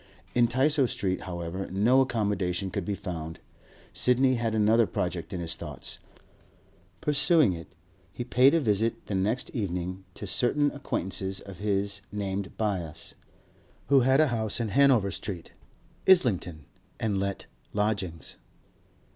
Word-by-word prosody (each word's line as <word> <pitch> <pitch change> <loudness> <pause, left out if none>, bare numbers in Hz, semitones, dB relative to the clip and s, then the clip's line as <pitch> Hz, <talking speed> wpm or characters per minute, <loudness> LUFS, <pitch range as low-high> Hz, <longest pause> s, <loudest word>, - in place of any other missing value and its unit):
In 120 -1 +4
Tysoe 135 +2 +2
Street, 95 -2 -2
however, 85 +2 -4
no 115 +8 +4
accommodation 100 -6 -1
could 100 -2 -3
be 100 - -1
found. 80 -4 -6 0.5
Sidney 130 +1 +3
had 115 -2 -1
another 110 +1 +4
project 90 -1 -3
in 95 - -4
his 85 -1 -2
thoughts; - - -7 1.0
pursuing 150 - +4
it, 85 -1 -8 0.4
he 120 - -5
paid 130 +4 +4
a - - +4
visit 110 -3 0
the - - -5
next 105 +6 0
evening 90 -4 -3
to - - -6
certain 140 +8 +2
acquaintances 95 -7 -3
of 95 -3 -11
his 100 -1 -1
named 100 -1 -3
Byass, 90 -8 -3 0.8
who 140 -1 +6
had 130 +2 +4
a 155 -2 +5
house 110 -3 0
in 115 -2 -1
Hanover 125 -5 +4
Street, 90 -4 -5 0.6
Islington, 90 - +3 0.3
and 105 -3 0
let 100 0 -3 0.3
lodgings. 100 -7 -2
105 Hz, 135 wpm, -28 LUFS, 95-125 Hz, 1.0 s, who